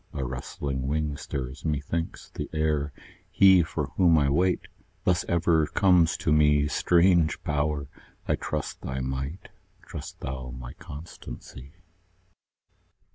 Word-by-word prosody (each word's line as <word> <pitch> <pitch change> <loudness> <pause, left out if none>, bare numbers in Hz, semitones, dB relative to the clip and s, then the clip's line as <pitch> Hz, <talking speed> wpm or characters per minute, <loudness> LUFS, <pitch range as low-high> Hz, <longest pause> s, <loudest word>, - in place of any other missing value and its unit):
a 70 - -3
rustling 65 +1 -4
wing 75 0 -1
stirs, 65 -1 -5
methinks, 80 +2 -3
the 75 - -5
air: 75 -2 0 0.4
He 95 -2 +6
for 75 -3 -3
whom 85 -4 +5
I 70 -2 +3
wait, 90 +6 +2 0.4
thus 90 -1 +2
ever 85 -2 +3
comes 90 -4 +4
to 75 - +1
me; 75 -1 +4
Strange 85 -1 +3
Power! 75 -1 -1 0.4
I - - +3
trust - - -4
thy 65 0 -4
might; 65 +6 -4 0.3
trust - - -8
thou 65 -1 -5
my 60 -1 -8
constancy. 70 -2 -10
75 Hz, 125 wpm, -27 LUFS, 70-85 Hz, 0.4 s, He